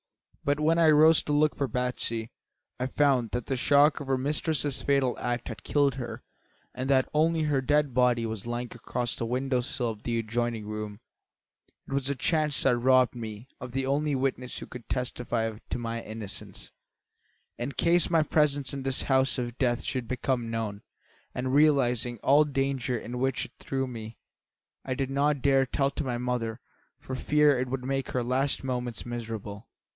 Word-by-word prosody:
But 145 +1 +1
when 160 +2 +3
I 165 -1 +6
rose 155 +1 +6
to - - -2
look 150 +1 +3
for 140 - -1
Batsy 125 -3 -2 0.5
I 130 - 0
found 130 -4 +2
that 120 +1 -3
the 135 - -1
shock 145 +4 +4
of 145 - -7
her 135 -1 +2
mistress's 145 +1 -1
fatal 140 -3 +2
act 120 -1 -2
had 115 - -8
killed 140 -3 +2
her 125 -3 -6 0.5
and 130 +2 -4
that 130 -2 +4
only 160 +1 +2
her 145 -3 +1
dead 145 0 +2
body 125 -2 +3
was 110 -1 -5
lying 120 +1 -3
across 120 0 -3
the 115 - -3
window 130 +1 0
sill 125 -1 -2
of 110 -2 -7
the 115 0 -1
adjoining 115 0 -2
room. 105 0 -5 0.9
It - - -6
was 140 -1 0
a 140 - 0
chance 150 +1 +1
that 130 -2 +4
robbed 130 +1 +4
me 110 -1 -7
of 125 -2 -8
the 135 0 -1
only 145 +2 +1
witness 130 -1 -2
who - - -6
could 125 -2 -11
testify 120 -3 -2
to - - -2
my 115 -1 -3
innocence, 105 -3 -7 0.9
in 125 +4 -3
case 170 +4 +3
my 165 -2 +4
presence 145 -3 +1
in 140 - -4
this 135 0 0
house 135 0 +2
of 120 -2 -3
death 120 -2 +1
should 125 -3 -3
become 125 -1 -1
known, 110 -3 -3 0.5
and 130 +1 -2
realising 125 -5 +3
all 145 +3 +6
the 150 - -6
danger 135 -2 0
in 120 +2 -6
which 130 0 0
it - - -13
threw 135 0 -2
me, 115 -3 -8 0.7
I 130 - -2
did 135 0 -2
not 140 0 +1
dare 135 -2 +4
to - - -39 0.2
tell - - -32
my 125 -3 -2
mother, 120 -2 -2 0.4
for 130 - -8
fear 145 +1 +3
it 130 - -1
would 125 -1 -3
make 135 0 -1
her 125 - -1
last 130 +4 +1
moments 125 -3 -3
miserable. 110 -3 -6
130 Hz, 185 wpm, -28 LUFS, 120-140 Hz, 0.9 s, I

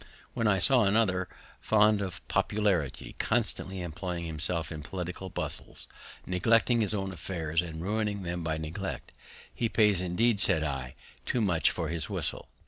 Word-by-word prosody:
When 115 - +1
I 100 -2 +4
saw 120 +4 +5
another 100 -3 +2 0.3
fond 105 -1 +4
of 95 -4 -5
popularity, 100 -10 0
constantly 95 -1 0
employing 85 +1 -4
himself 80 0 -2
in 80 -2 -5
political 90 +3 -5
bustles, - - -4 0.4
neglecting 115 +6 +3
his 105 0 0
own 95 -1 -2
affairs, 80 -2 -1
and 80 -1 -6
ruining 105 0 -1
them 85 -1 -3
by 80 -1 -1
neglect, 80 +5 -5 0.4
He 115 - -1
pays, 105 -5 +4
indeed, 100 +5 +2
said 80 -5 +3
I, 70 -3 -3 0.3
too 125 - +1
much 85 - +3
for 85 -3 -3
his 85 -2 -3
whistle. - - -3
90 Hz, 150 wpm, -29 LUFS, 80-105 Hz, 0.4 s, saw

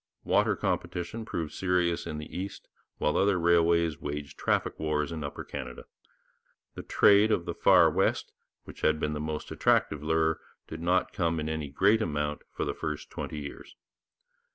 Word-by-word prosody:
Water - - +2
competition 90 +6 -3
proved 80 -7 -4
serious 90 -2 0
in 75 - -4
the 75 - -8
east, 95 +2 -6 0.3
while 75 - 0
other 100 -1 +3
railways 85 -2 +3
waged 75 -1 -5
traffic - - -1
wars 75 0 -1
in 80 -2 -4
Upper 70 - -5
Canada. 65 -3 -7 0.9
The - - -7
trade 105 +2 +5
of 85 - +1
the - - -3
far - - +6
west, - - 0 0.3
which - - -12
had 80 0 +2
been 75 0 -1
the 75 - -3
most 75 0 -4
attractive 75 - +2
lure, 80 +1 +1 0.3
did 80 +1 -7
not 90 +2 +1
come 85 -2 0
in 75 - -3
any 80 -2 -3
great 105 +10 +3
amount 75 -4 -2
for - - -3
the - - -2
first 75 -1 -5
twenty - - -5
years. 70 - -9
80 Hz, 170 wpm, -29 LUFS, 75-85 Hz, 0.9 s, far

